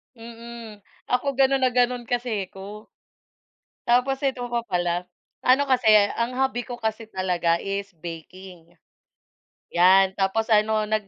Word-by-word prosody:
Mm, 230 -1 -10 0.3
ako 275 +2 0
ganun 270 0 +3
na 255 -1 +2
ganun 245 -1 +1
kasi 240 -5 -2
ko. 205 +3 -10 1.0
Tapos 250 +3 +2
eto 255 -3 -2
pa 235 -1 -1
pala, 175 -1 -1 0.4
ano 265 +3 +5
kasi, 255 -4 +1 0.3
ang 235 +2 -1
hobby 260 -2 -1
ko 245 - -5
kasi 220 -1 -4
talaga 180 -4 0
is 200 -1 -4
baking, 170 +1 -11 1.0
'yan, 190 +2 +5
tapos 220 +4 0
ano 215 0 +3
nag 215 -1 -2
220 Hz, 130 wpm, -24 LUFS, 190-245 Hz, 1.0 s, ano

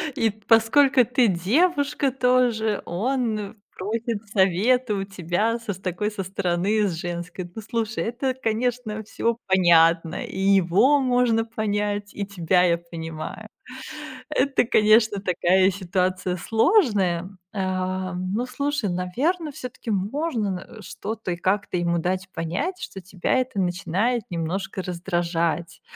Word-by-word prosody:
И 225 - +2
т 215 +1 -11
поскольку 245 +3 +5
ты 250 -1 +3
девушка 280 - +1
тоже, 245 -4 +2
он 220 +1 -2 0.2
просит 220 +2 -2
совета 210 +4 +2
у 195 - -2
тебя 195 +5 -1
со 220 -3 -4
с 185 - -12
такой, 190 +3 -2
со 195 -2 -4
стороны 195 +3 0
с 180 - -2
женской. 175 +1 -5
Ну 220 - -6
слушай, 225 0 -2
это, 255 +3 -1
конечно, 230 -2 -2
всё 230 +2 -1
понятно, 170 -3 +4
и - - -7
его 195 +8 +4
можно 245 -3 +2
понять, 205 -2 -2
и 205 - -3
тебя 180 -2 +2
я 170 -2 +3
понимаю. 165 +4 -7 0.8
Это, 275 -2 +2
конечно, 215 -1 +4
такая 185 0 +3
ситуация 185 -1 -1
сложная. 205 - +2 0.2
Ам, 185 -1 -2
ну 235 +4 0
слушай, 275 -3 -2
наверно, 275 - -1
всё-таки 250 -4 -7
можно 220 - -1
н 185 -2 -2 0.2
э, - - -10
что-то 210 0 -5
и - - -1
как-то 200 +2 0
ему 170 0 +1
дать 185 +2 -2
понять, 195 - -3
что 195 - -7
тебя 185 -1 -2
это 255 -5 0
начинает 195 +6 0
немножко 185 +3 -3
раздражать. 170 -2 -2
205 Hz, 130 wpm, -24 LUFS, 180-235 Hz, 0.8 s, поскольку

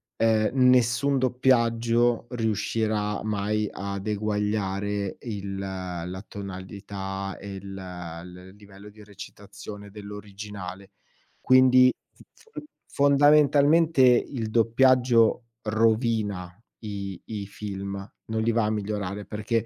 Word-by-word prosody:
ehm, 110 -1 +2 0.2
nessun 125 +3 +3
doppiaggio 120 -2 +2
riuscirà 110 -2 -1
mai 105 0 -1
ad 100 0 -5
eguagliare 105 -1 -1
il 100 -4 -5
la 95 -1 -5
tonalità, 95 0 -6
e 100 -1 -7
il 95 0 -8
l 90 0 -9
livello 100 0 -14
di 105 0 -15
recitazione 100 0 -11
dell'originale. 100 -2 -9 0.5
Quindi, 130 0 +6 0.2
f - - -19 0.3
f - - -3 0.3
fondamentalmente, 145 +2 +5
il 125 -2 +2
doppiaggio 120 0 +3 0.2
rovina 110 -4 0 0.3
i 100 -4 -6
i 105 -3 -5
film, 100 -1 -6 0.3
non 110 0 -2
li 115 - +2
va 115 -1 +1
a - - 0
migliorare 105 -1 -3
perché, 110 +2 -2
105 Hz, 100 wpm, -26 LUFS, 100-115 Hz, 0.5 s, Quindi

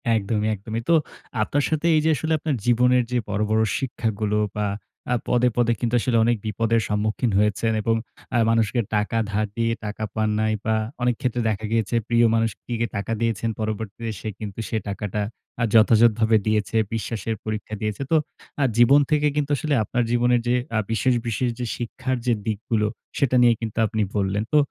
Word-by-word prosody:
একদমই, 105 0 0
একদমই। 110 +3 -5
তো 170 - +6 0.5
আপনার 145 +6 +1
সাথে 155 +1 -1
এইযে 155 +1 +3
আসলে 160 +4 -1
আপনার 150 -3 -1
জীবনের 125 +1 +4
যে 125 - +1
বড়, 105 +1 -1
বড় 110 0 +3 0.2
শিক্ষাগুলো 110 -5 -2 0.2
বা, 105 - 0 0.5
আ - - +3
পদে, 125 0 +3
পদে 120 -1 +3
কিন্তু 120 -1 -1
আসলে 120 0 +1
অনেক 120 -1 +2
বিপদের 115 +2 +1
সম্মুখীন 105 +2 0
হয়েছেন 105 +2 +1
এবং 115 +1 +1 0.4
আ - - +4
মানুষকে 115 0 +2 0.2
টাকা 105 +2 0
ধার 105 +1 0
দিয়ে 115 0 +1
টাকা 105 +1 -5
পান 110 -1 +1
নাই 110 0 +1
বা, 110 0 +2 0.3
অনেকক্ষেত্রে 125 0 0
দেখা 110 +1 -2
গিয়েছে 115 0 0
প্রিয় 120 0 +4
মানুষটিকে 115 +1 -1
টাকা 100 +2 -3
দিয়েছেন, 115 0 0
পরবর্তীতে 110 +1 -4
সে 110 - -4
কিন্তু 105 0 -6
সে 110 - -1
টাকাটা 105 +1 -3 0.4
আ - - +3
যথাযথভাবে 110 0 +5
দিয়েছে, 110 +1 0 0.2
বিশ্বাসের 115 0 -3
পরীক্ষা 110 0 -4
দিয়েছে। 105 +3 -2
তো - - +5 0.5
আ - - +4
জীবন 125 +5 +7
থেকে 150 0 +3
কিন্তু 145 -1 -1
আসলে 150 +1 -1
আপনার 120 +3 0
জীবনের 120 0 +3
যে 125 - +3 0.2
আ - - +3
বিশেষ, 125 +3 +2
বিশেষ 120 +2 0
যে 125 - -2
শিক্ষার 125 +2 -3
যে 120 - +3
দিকগুলো, 110 0 0 0.3
সেটা 130 -2 +2
নিয়ে 120 -1 +6
কিন্তু 110 -1 -5
আপনি 110 0 -2
বললেন। 100 +1 0
তো 150 - +6
115 Hz, 175 wpm, -23 LUFS, 110-120 Hz, 0.5 s, জীবন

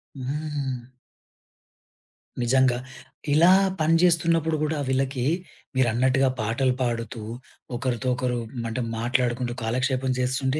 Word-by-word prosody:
హ్మ్. 135 -2 -4 1.6
నిజంగా. 130 0 +3 0.6
ఇలా 170 +4 +6 0.3
పనిజేస్తున్నప్పుడు 165 -1 +3
గూడా, 155 0 0
వీళ్ళకి, 130 -1 0 0.5
మీరన్నట్టుగా 130 +2 +3
పాటలు 125 +4 +1
పాడుతూ, 115 -2 -2 0.5
ఒకరితో 130 +1 -2
ఒకరు 125 -1 -1 0.3
మంటే 115 +2 -2 0.2
మాట్లాడుకుంటూ, 120 0 0
కాలక్షేపం 130 +2 0
జేస్తుంటే, 130 +3 0
130 Hz, 85 wpm, -25 LUFS, 120-145 Hz, 1.6 s, ఇలా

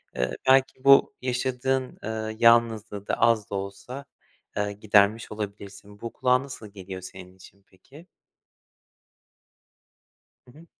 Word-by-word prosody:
eee, 65 0 -1 0.2
belki 130 0 +3
bu 140 0 +6
yaşadığın, 130 +1 -1
eee, 110 0 -4
yalnızlığı 115 -3 +3
da - - -1
az 115 -3 +3
da - - -4
olsa, 100 +8 -6 0.5
ııı, 105 0 -1
gidermiş 105 +1 +2
olabilirsin. 100 -1 -8
Bu 115 - -6
kulağa 125 0 +2
nasıl 130 -5 -9
geliyor 95 -2 -9
senin 90 0 -11
için 95 +1 -18
peki? 140 - -18 2.4
Hı - - -16
hı. 165 - -15
110 Hz, 120 wpm, -26 LUFS, 100-125 Hz, 2.4 s, bu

